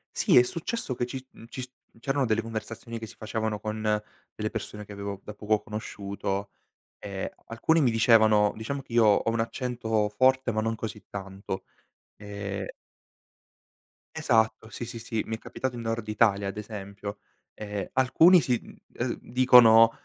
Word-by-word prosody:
Sì, - - +4
è 125 - +9
successo 170 - -3
che 120 - -1
ci 130 +1 -7
mhmm, - - -13
ci 130 - -7
s 130 - -7 0.2
mhmm, - - -22
c'erano 135 +3 0
delle 110 -1 +1
conversazioni 115 +1 -6
che 110 - -6
si - - -13
facevano 110 -1 -3
con 110 +1 -4 0.5
delle 110 0 -2
persone 105 -1 -6
che 105 - -13
avevo 100 -1 -6
da 105 - -8
poco 105 0 0
conosciuto, 100 -2 -4 0.5
e 100 -2 -5
alcuni 160 +8 +2
mi 130 - +4
dicevano 110 -2 +5
diciamo 135 +6 -4
che 125 -3 -13
io 115 -1 +5
ho 105 +1 +4
un 115 - -1
accento 115 -3 -1
forte 130 +3 +3
ma 110 0 0
non 115 +1 -1
così 110 -2 -6
tanto. 95 -1 -6 0.5
Ehm 100 -1 -5 1.5
Esatto, 110 -7 +1
sì, 120 - -6
sì, 115 0 -7
sì, 115 -1 -2
mi 110 - -3
è - - -8
capitato 130 +2 -4
in 120 - -5
Nord 115 -1 -3
Italia 105 -2 +2
ad 100 - -5
esempio. 100 -1 -7 0.3
Ehm, 105 -2 -5
alcuni 160 +8 +6
sì, 125 -4 +1
mhmm, - - -14 0.2
ehm, - - -2
dicono: 120 -3 +7
110 Hz, 170 wpm, -27 LUFS, 105-120 Hz, 1.5 s, è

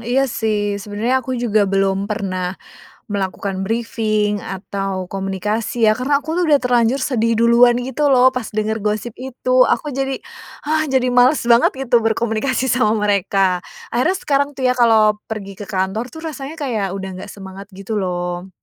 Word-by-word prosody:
Iya 255 +4 +1
sih, 205 -3 -1
sebenernya 225 +6 -1
aku 260 +1 -3
juga 215 -3 +2
belum 195 0 0
pernah 185 -3 -2 0.6
melakukan 195 -1 -3
brifing, 215 -2 0
atau 195 -1 -4
komunikasi, 210 +4 -1
ya 215 - +6
karena 280 +2 +2
aku 315 +3 -4
udah 295 -2 +5
terlanjur 245 +1 +2
sedih 230 -4 +1
duluan 235 +1 +5
gitu 265 +4 -1
loh 260 -1 +6
pas 250 -3 -3
denger 215 +1 -1
gosip 215 +2 -2
itu, 255 0 +1
aku 295 - 0
jadi, 270 0 -2 0.5
hah, 310 +1 +1
jadi 260 -1 +2
males 250 +3 +4
banget 235 0 +5 0.2
gitu 240 0 +4
berkomunikasi 225 +3 0
sama 220 -3 +2
mereka, 195 -2 +1 0.3
akhirnya 315 +11 +2
sekarang 280 0 +1
tuh 260 - -2
ya 250 - +3
kalau 220 -3 +4
pergi 200 -3 -5
ke 205 - -6
kantor 195 +5 -2
tuh 320 - -11
rasanya 300 0 -6
kayak 225 -10 -2
udah 190 -1 -5
nggak - - -9
semangat 195 0 -10
gitu 195 +3 -5
loh. 180 0 -3
220 Hz, 160 wpm, -19 LUFS, 195-255 Hz, 0.6 s, ya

